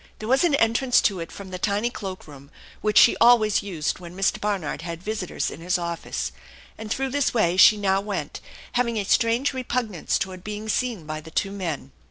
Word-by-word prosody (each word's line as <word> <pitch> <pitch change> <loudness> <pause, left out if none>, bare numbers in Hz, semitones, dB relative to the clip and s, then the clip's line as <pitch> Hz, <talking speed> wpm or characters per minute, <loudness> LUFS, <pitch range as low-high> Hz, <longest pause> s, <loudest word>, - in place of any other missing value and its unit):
There 215 - -7
was 265 +5 +3
an 335 -5 +3
entrance 240 +1 +3
to 195 -3 +1
it 165 - -6
from 195 -2 -10
the 185 - -5
tiny 210 +5 0
cloak 190 -5 -7
room, 140 -1 -13 0.3
which 210 -1 +1
she - - +7
always 230 -3 +5
used 160 -7 -3
when 175 0 -10
Mr. 195 - +1
Barnard 200 -8 -2
had 170 0 -6
visitors 210 -3 -3
in - - -10
his 180 +2 0
office, 170 -1 -4 0.4
and 220 -1 -8
through 270 +4 -1
this 285 -2 0
way 180 -6 +2
she 210 +3 +7
now 195 -1 +1
went, 205 0 -5 0.3
having 235 -2 0
a 205 - 0
strange 230 +7 +2
repugnance 240 -7 -1
toward 185 -1 -5
being 210 +1 -6
seen 230 -7 -1
by 155 0 -5
the 160 - -12
two 195 +4 -1
men. 165 -9 -4
200 Hz, 205 wpm, -24 LUFS, 175-230 Hz, 0.4 s, she